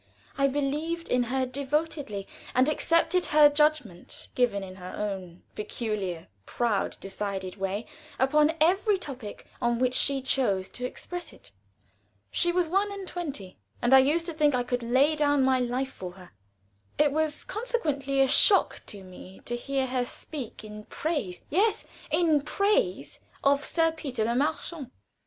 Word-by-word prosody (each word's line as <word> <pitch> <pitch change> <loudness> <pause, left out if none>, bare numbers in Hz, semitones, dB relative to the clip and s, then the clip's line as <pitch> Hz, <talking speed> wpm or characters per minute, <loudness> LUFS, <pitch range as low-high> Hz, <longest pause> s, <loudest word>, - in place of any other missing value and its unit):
I 275 0 +3
believed 295 +5 -2
in 250 - +3
her 260 +2 0
devotedly, 280 -5 -2 0.3
and 255 +2 +4
accepted 335 +3 +2
her 300 -1 +7
judgment, 295 - -1
given 235 -6 +1
in 185 0 -9
her 180 -1 -8
own 190 -4 -5
peculiar 210 -6 -4 0.2
proud, 235 -4 -1
decided 195 -1 -4
way, 195 +3 -2 0.3
upon 300 +4 +3
every 385 +6 +3
topic 260 - -7 0.2
on 240 0 +1
which 250 +1 +1
she 275 0 +2
chose 205 -9 +1
to 250 - -6
express 355 +6 -7
it. - - -14 0.8
She 345 - +2
was 355 -1 +1
one 395 +4 +1
and 395 -2 -6
twenty, 280 - -6 0.2
and 240 +2 +2
I 265 - +10
used 305 +6 +2
to 335 - -3
think 300 -3 +3
I 245 - +1
could 245 0 -2
lay 260 +6 +3
down 290 -2 +2
my 260 -1 +3
life 250 +2 -1
for 180 -6 -8
her. 180 -3 -14 0.7
It 300 -1 +4
was 310 0 -1
consequently 295 - -1
a 270 - +5
shock 395 - +5
to 200 -2 -8
me 185 0 -12
to 240 - -2
hear 270 +2 -1
her 255 -1 0
speak 255 -3 -6
in 210 0 -9
praise 280 - -3
yes, 410 +8 +2 0.3
in 320 -4 +3
praise 285 - 0 0.2
of 280 +1 +3
Sir 325 0 +2
Peter 270 -8 -3
Le 235 - 0
Marchant. 280 +1 -2
270 Hz, 155 wpm, -27 LUFS, 215-310 Hz, 0.8 s, I